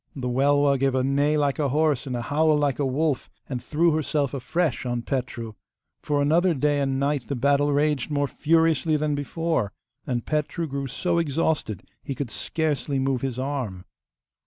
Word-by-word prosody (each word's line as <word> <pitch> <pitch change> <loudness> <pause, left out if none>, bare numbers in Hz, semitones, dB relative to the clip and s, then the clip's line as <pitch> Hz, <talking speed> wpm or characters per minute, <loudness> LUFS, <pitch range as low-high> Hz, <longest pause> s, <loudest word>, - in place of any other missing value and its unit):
The 130 -3 -3
Welwa 140 +2 +3
gave 135 -1 +1
a 130 - +2
neigh 145 +3 +2
like 145 0 +1
a 145 -2 +1
horse 150 -1 +1
and 125 - -2
a 120 - -3
howl 155 +3 +2
like 145 -3 0
a 145 - +1
wolf, 145 +1 0 0.2
and 125 -3 -4
threw 165 +2 +2
herself 150 -2 0
afresh 145 +4 -1
on 120 -1 -2
Petru. 125 -4 -3 0.5
For 145 -1 +1
another 170 +4 +3
day 145 +1 +1
and 135 -1 0
night 140 -2 0
the 140 - -2
battle 140 +3 +2
raged 145 -1 +1
more 145 -1 +1
furiously 160 +1 +2
than 150 0 0
before. 145 - -1 0.4
And 120 -3 -2
Petru 155 +2 -1
grew 140 -2 -3
so 170 +6 0
exhausted 150 - -1 0.2
he 135 - -5
could 130 -3 -4
scarcely 150 -3 -1
move 135 -1 0
his 130 -3 -3
arm. 130 -9 -3
145 Hz, 180 wpm, -25 LUFS, 130-150 Hz, 0.5 s, Welwa